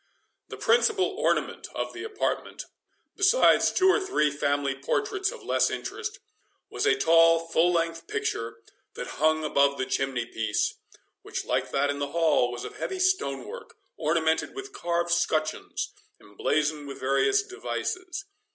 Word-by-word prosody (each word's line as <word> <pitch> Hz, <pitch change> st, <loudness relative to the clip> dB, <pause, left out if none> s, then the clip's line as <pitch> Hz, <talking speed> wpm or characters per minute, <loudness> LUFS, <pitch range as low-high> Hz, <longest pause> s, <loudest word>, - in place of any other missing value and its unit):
The -, -, -8 dB
principal 445 Hz, -4 st, +3 dB
ornament 405 Hz, +4 st, -1 dB
of -, -, -3 dB
the -, -, -7 dB
apartment, 425 Hz, -2 st, -3 dB, 0.5 s
besides 395 Hz, +6 st, +5 dB
two 375 Hz, -, +3 dB
or 380 Hz, -, +5 dB
three 380 Hz, -, +1 dB
family 140 Hz, -1 st, 0 dB
portraits 390 Hz, -, -1 dB
of 485 Hz, -, -11 dB
less -, -, +2 dB
interest, 450 Hz, +1 st, -5 dB, 0.5 s
was -, -, -1 dB
a 425 Hz, 0 st, +4 dB
tall 165 Hz, -, +5 dB
full 165 Hz, +1 st, +3 dB
length 165 Hz, -1 st, -1 dB
picture, 115 Hz, 0 st, -3 dB, 0.3 s
that -, -, -5 dB, 0.2 s
hung 155 Hz, 0 st, +3 dB
above 140 Hz, -2 st, +2 dB
the 130 Hz, -, -1 dB
chimney 130 Hz, -2 st, -1 dB
piece, 110 Hz, -2 st, -1 dB, 0.5 s
which, -, -, -5 dB
like -, -, 0 dB
that 145 Hz, +1 st, +1 dB
in 140 Hz, -, -5 dB
the 140 Hz, +1 st, -3 dB
hall, 160 Hz, -7 st, +3 dB
was 120 Hz, -, -6 dB
of -, -, -9 dB
heavy 380 Hz, -, -3 dB
stone 365 Hz, -, 0 dB
work, -, -, -9 dB, 0.2 s
ornamented 160 Hz, -, 0 dB
with 400 Hz, 0 st, -7 dB
carved 170 Hz, 0 st, -1 dB
scutcheons, 155 Hz, -2 st, -1 dB, 0.3 s
emblazoned 150 Hz, +7 st, -1 dB
with 140 Hz, -, -8 dB
various 140 Hz, -, +2 dB
devices. 370 Hz, -2 st, -4 dB
165 Hz, 150 wpm, -27 LUFS, -, 0.5 s, besides